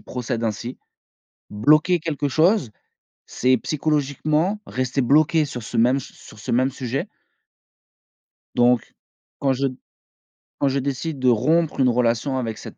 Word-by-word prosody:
procède 120 Hz, -1 st, -4 dB
ainsi. 115 Hz, +3 st, -3 dB, 0.7 s
Bloquer 155 Hz, -, +3 dB
quelque 150 Hz, -3 st, -2 dB
chose, 160 Hz, -, +2 dB, 0.5 s
c'est 130 Hz, +1 st, +1 dB
psychologiquement 155 Hz, +6 st, -1 dB
rester 130 Hz, +1 st, -2 dB
bloqué 155 Hz, +4 st, +3 dB
sur 125 Hz, -4 st, -7 dB
ce 110 Hz, -, -4 dB
même 125 Hz, +4 st, +4 dB
s 135 Hz, -, -6 dB
sur 110 Hz, -, -15 dB
ce -, -, -6 dB
même 130 Hz, +3 st, +2 dB
sujet. 130 Hz, +1 st, -4 dB, 1.5 s
Donc, 120 Hz, -1 st, +2 dB, 0.4 s
quand 135 Hz, -1 st, +2 dB
je 135 Hz, +1 st, 0 dB, 0.9 s
quand 140 Hz, -, +2 dB
je 135 Hz, +1 st, 0 dB
décide 140 Hz, +3 st, -3 dB
de 130 Hz, -, 0 dB
rompre 155 Hz, +7 st, +2 dB
une 130 Hz, -1 st, +4 dB
relation 120 Hz, +2 st, +1 dB
avec 115 Hz, -3 st, -3 dB
cette -, -, -10 dB
135 Hz, 135 wpm, -22 LUFS, 125-150 Hz, 1.5 s, même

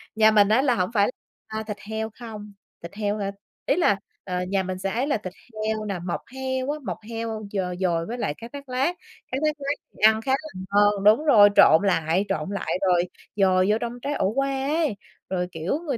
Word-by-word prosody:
nhà 220 Hz, 0 st, +6 dB
mình 205 Hz, -1 st, +5 dB
á 225 Hz, +4 st, +4 dB
là 265 Hz, -3 st, +2 dB
hổng 180 Hz, -1 st, 0 dB
phải, 205 Hz, -3 st, +3 dB, 0.4 s
a, 220 Hz, 0 st, -4 dB
thịt 210 Hz, -1 st, -4 dB
heo 220 Hz, 0 st, -2 dB
không, 210 Hz, -3 st, -8 dB, 0.3 s
thịt 170 Hz, -, -8 dB
heo 210 Hz, 0 st, -1 dB
hả? 200 Hz, -1 st, -2 dB, 0.3 s
Ý -, -, +2 dB
là, 260 Hz, -, +3 dB, 0.3 s
ờ, 180 Hz, -1 st, -2 dB
nhà 195 Hz, -1 st, +1 dB
mình 185 Hz, 0 st, -4 dB
sẽ 195 Hz, 0 st, -2 dB
ấy 250 Hz, +5 st, 0 dB
là 290 Hz, -, +1 dB
thịt 185 Hz, -4 st, -8 dB, 0.3 s
heo 215 Hz, -1 st, -1 dB
nè, 195 Hz, -4 st, -3 dB
mọc 175 Hz, -, -2 dB
heo 260 Hz, +1 st, -2 dB
á, 305 Hz, -, -4 dB
mọc -, -, -3 dB
heo 225 Hz, -1 st, -4 dB
d -, -, -9 dB, 0.2 s
dồi 170 Hz, -3 st, +1 dB
với 240 Hz, -, -5 dB
lại 145 Hz, -11 st, -1 dB
cá 230 Hz, -, -8 dB
thát 280 Hz, -2 st, -9 dB
lát, 270 Hz, +8 st, 0 dB, 0.4 s
cá 260 Hz, -, 0 dB
thát 305 Hz, -, +2 dB
lát 285 Hz, +1 st, -1 dB, 0.2 s
thì -, -, -19 dB
ăn 220 Hz, 0 st, +5 dB
khá 265 Hz, -, -2 dB
là 305 Hz, +4 st, 0 dB, 0.3 s
ngon. 205 Hz, -1 st, +4 dB
Đúng 215 Hz, +9 st, +5 dB
rồi, 210 Hz, -8 st, +8 dB
trộn 160 Hz, +5 st, +7 dB
lại, 170 Hz, +1 st, +1 dB
trộn 155 Hz, +4 st, -2 dB
lại 195 Hz, -2 st, -2 dB
rồi 175 Hz, -1 st, +3 dB, 0.3 s
dồi 185 Hz, -2 st, +3 dB
vô 215 Hz, -, +3 dB
trong 240 Hz, +1 st, -4 dB
trái 285 Hz, +3 st, -2 dB
ổ 190 Hz, -, +1 dB
qua 275 Hz, 0 st, 0 dB
ấy, 305 Hz, -5 st, +1 dB, 0.3 s
rồi, 180 Hz, -1 st, -1 dB
kiểu, 170 Hz, -, -2 dB
người 270 Hz, -5 st, 0 dB
215 Hz, 230 wpm, -25 LUFS, 190-260 Hz, 0.4 s, rồi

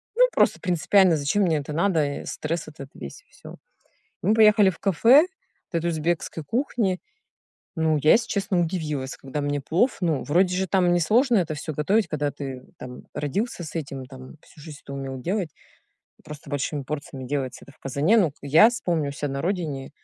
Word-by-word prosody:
Ну, -, -, +6 dB
просто -, -, +2 dB
принципиально, 180 Hz, 0 st, +3 dB
зачем 150 Hz, +8 st, +1 dB
мне 165 Hz, -4 st, +2 dB
это 150 Hz, +1 st, -5 dB
надо, 155 Hz, -5 st, 0 dB
стресс 165 Hz, +2 st, -4 dB
этот 140 Hz, -3 st, -10 dB
весь 70 Hz, -, -9 dB
и -, -, -42 dB
всё. -, -, -12 dB, 0.7 s
Мы 200 Hz, +5 st, +2 dB
поехали 210 Hz, -2 st, +6 dB
в 175 Hz, -, -6 dB
кафе 235 Hz, -, +5 dB, 0.4 s
вот 170 Hz, -, 0 dB
это 170 Hz, -, -2 dB
узбекской 160 Hz, 0 st, -2 dB
кухни. 220 Hz, -, -1 dB, 0.8 s
Ну, 160 Hz, -1 st, +1 dB
я, 155 Hz, -, +6 dB
если 230 Hz, +1 st, +2 dB
честно, 195 Hz, -2 st, 0 dB
удивилась, 155 Hz, -6 st, -3 dB
когда 135 Hz, +2 st, -5 dB
мне 145 Hz, 0 st, -1 dB
плов 185 Hz, -, +1 dB
Ну, 155 Hz, -7 st, +1 dB
вроде 180 Hz, +4 st, +2 dB
же 190 Hz, +1 st, 0 dB
там 180 Hz, -2 st, +3 dB
несложно 225 Hz, -, +3 dB
это 170 Hz, -5 st, 0 dB
всё 155 Hz, +1 st, -5 dB
готовить, 195 Hz, +9 st, +1 dB
когда 150 Hz, -1 st, -1 dB
ты 135 Hz, -3 st, -7 dB, 0.2 s
там 125 Hz, 0 st, -9 dB
родился 175 Hz, -, -3 dB
с 155 Hz, -, -9 dB
этим, 140 Hz, -3 st, -6 dB
там 130 Hz, +3 st, -12 dB
всю -, -, -18 dB
жизнь 150 Hz, -2 st, -10 dB
это -, -, -9 dB
умел 135 Hz, -1 st, -5 dB
делать, 185 Hz, +1 st, -1 dB, 0.8 s
просто 150 Hz, -1 st, -10 dB
большими 145 Hz, 0 st, -2 dB
порциями 135 Hz, -2 st, -6 dB
делается 135 Hz, -1 st, -4 dB
это 140 Hz, -, -14 dB
в -, -, -39 dB
казане. 140 Hz, -, +1 dB
Но 190 Hz, -8 st, +3 dB
к 140 Hz, -, -26 dB
я 150 Hz, +9 st, +6 dB
с 240 Hz, -, -5 dB
помню 160 Hz, -5 st, -1 dB
у -, -, -7 dB
ся 145 Hz, 0 st, -4 dB
на 140 Hz, 0 st, -4 dB
родине, 160 Hz, -8 st, -3 dB
160 Hz, 190 wpm, -24 LUFS, 145-190 Hz, 0.8 s, Ну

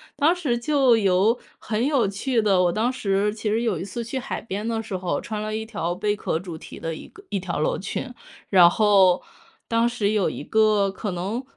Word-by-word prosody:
当 315 Hz, +5 st, +3 dB
时 295 Hz, -9 st, -1 dB
就 265 Hz, 0 st, +3 dB
有 200 Hz, +2 st, +3 dB, 0.2 s
很 220 Hz, +1 st, -2 dB
有 275 Hz, -8 st, +2 dB
趣 230 Hz, +6 st, -1 dB
的， 200 Hz, -4 st, +3 dB
我 175 Hz, -, +3 dB
当 230 Hz, +6 st, 0 dB
时 205 Hz, -3 st, 0 dB
其 215 Hz, 0 st, -3 dB
实 225 Hz, +2 st, 0 dB
有 215 Hz, -8 st, 0 dB
一 -, -, -4 dB
次 200 Hz, +5 st, -5 dB
去 250 Hz, +4 st, -4 dB
海 270 Hz, +2 st, -4 dB
边 210 Hz, 0 st, -5 dB
的 225 Hz, -1 st, -2 dB
时 210 Hz, -3 st, -5 dB
候， 180 Hz, -1 st, -2 dB
穿 215 Hz, -2 st, -5 dB
了 215 Hz, 0 st, -3 dB
一 220 Hz, 0 st, -3 dB
条 205 Hz, -6 st, -3 dB
贝 205 Hz, +2 st, 0 dB
壳 160 Hz, -, -2 dB
主 175 Hz, -1 st, -7 dB
题 160 Hz, -, -10 dB
的 165 Hz, -, -4 dB
一 -, -, -10 dB
个 405 Hz, -, -16 dB
一 200 Hz, -, -1 dB
条 180 Hz, -2 st, -4 dB
洛 150 Hz, -, 0 dB
裙。 245 Hz, +6 st, -5 dB, 0.4 s
然 180 Hz, -3 st, +7 dB
后， 195 Hz, -3 st, +4 dB, 0.4 s
当 230 Hz, +1 st, +2 dB
时 215 Hz, -4 st, 0 dB
有 210 Hz, -3 st, +1 dB
一 -, -, -6 dB
个 215 Hz, -2 st, +2 dB
可 205 Hz, +2 st, -5 dB
能， 195 Hz, +8 st, -3 dB
210 Hz, 240 characters per minute, -24 LUFS, 190-230 Hz, 0.4 s, 然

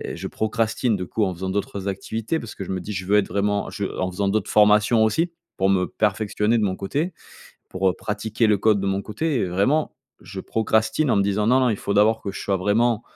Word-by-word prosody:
je -, -, -5 dB
procrastine 110 Hz, +1 st, 0 dB
de 95 Hz, -, -3 dB
coup, 105 Hz, +4 st, -2 dB
en 95 Hz, -2 st, 0 dB
faisant 95 Hz, +2 st, -4 dB
d'autres 100 Hz, 0 st, -3 dB
activités, 110 Hz, -, -3 dB
parce 115 Hz, -, -9 dB
que -, -, -6 dB
je 95 Hz, -, -6 dB
me 95 Hz, -, -2 dB
dis, 105 Hz, -, -7 dB
je 95 Hz, -1 st, -4 dB
veux 100 Hz, +2 st, +3 dB
être 105 Hz, -, +2 dB
vraiment, 100 Hz, 0 st, -1 dB
je 100 Hz, -, -4 dB
en 95 Hz, 0 st, 0 dB
faisant 100 Hz, +2 st, -1 dB
d'autres 100 Hz, 0 st, 0 dB
formations 105 Hz, +2 st, +5 dB
aussi. 160 Hz, +11 st, +1 dB, 0.3 s
Pour 95 Hz, +1 st, +2 dB
me 90 Hz, -2 st, +2 dB
perfectionner 105 Hz, +2 st, 0 dB
de 110 Hz, -, +1 dB
mon 95 Hz, -2 st, 0 dB
côté 145 Hz, -, -2 dB, 0.6 s
pour, 95 Hz, +1 st, 0 dB
heu, -, -, -1 dB
pratiquer 110 Hz, +3 st, -1 dB
le 105 Hz, -2 st, +3 dB
code 105 Hz, -1 st, +3 dB
de 100 Hz, -, -2 dB
mon 95 Hz, +1 st, -1 dB
côté, 140 Hz, +8 st, -2 dB
heu, 90 Hz, -, -1 dB
vraiment. 130 Hz, -, +1 dB, 0.3 s
Je 95 Hz, -, -7 dB
procrastine 110 Hz, +7 st, 0 dB
en -, -, +3 dB
me 100 Hz, -, +3 dB
disant: 100 Hz, +1 st, 0 dB
«Non, 130 Hz, +2 st, +4 dB
non, 125 Hz, -, +3 dB
il 105 Hz, -, -1 dB
faut 100 Hz, -, -3 dB
d'abord 110 Hz, +2 st, +4 dB
que 100 Hz, -, -3 dB
je -, -, -7 dB
sois 100 Hz, -1 st, 0 dB
vraiment 110 Hz, +4 st, +1 dB
105 Hz, 240 wpm, -23 LUFS, 95-110 Hz, 0.6 s, formations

